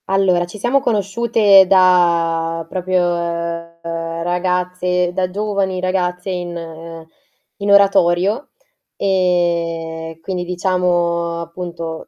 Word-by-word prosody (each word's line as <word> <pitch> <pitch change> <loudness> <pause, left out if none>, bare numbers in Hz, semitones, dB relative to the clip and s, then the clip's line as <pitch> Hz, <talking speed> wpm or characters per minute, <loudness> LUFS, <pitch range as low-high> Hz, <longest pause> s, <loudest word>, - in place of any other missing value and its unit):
Allora, 190 -2 +2
ci 175 +4 -11
siamo 245 +6 +1
conosciute 210 -3 +3
da 170 -3 +3
proprio 185 +1 -1 0.8
ragazze 180 +2 -1
da 185 0 -1
giovani 195 -1 -2
ragazze 180 0 -2
in 165 -2 -7 0.5
in 200 0 -1
oratorio 200 - +3 0.5
e 170 -3 -1
quindi, 180 +1 -3
diciamo, 175 -2 0
appunto, 170 -1 -7
180 Hz, 85 wpm, -18 LUFS, 170-190 Hz, 0.8 s, conosciute